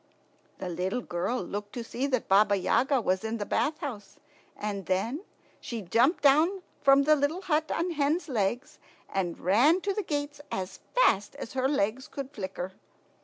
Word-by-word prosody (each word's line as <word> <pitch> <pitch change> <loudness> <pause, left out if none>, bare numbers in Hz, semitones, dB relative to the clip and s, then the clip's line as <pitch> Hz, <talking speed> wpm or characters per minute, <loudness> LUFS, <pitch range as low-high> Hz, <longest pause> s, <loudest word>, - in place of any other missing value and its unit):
The - - -5
little 185 +7 -2
girl 185 +5 -2
looked 205 +3 -6
to 240 - -4
see 250 +4 -2
that 255 -4 -1
Baba 205 +1 +5
Yaga 255 +8 +2
was 185 -3 0
in 220 +1 -2
the 205 - -3
bath 305 +8 0
house, 225 -8 -6 0.4
and 200 -2 -4
then 225 - 0 0.4
she 230 -3 -5
jumped 240 - +2
down 320 +7 +4 0.2
from 275 0 +6
the 305 +2 +5
little 300 +6 -1
hut 315 -3 +1
on 345 +2 -1
hen's 305 +3 0
legs, 240 0 -2 0.3
and 180 -3 -2
ran 245 - +4
to 400 +1 -1
the 420 - -1
gates 290 -4 -3
as 190 0 -4 0.2
fast 215 - +3
as - - -7
her 260 0 +1
legs 260 0 0
could 275 -2 -6
flicker. 190 -5 -5
250 Hz, 170 wpm, -28 LUFS, 200-290 Hz, 0.4 s, from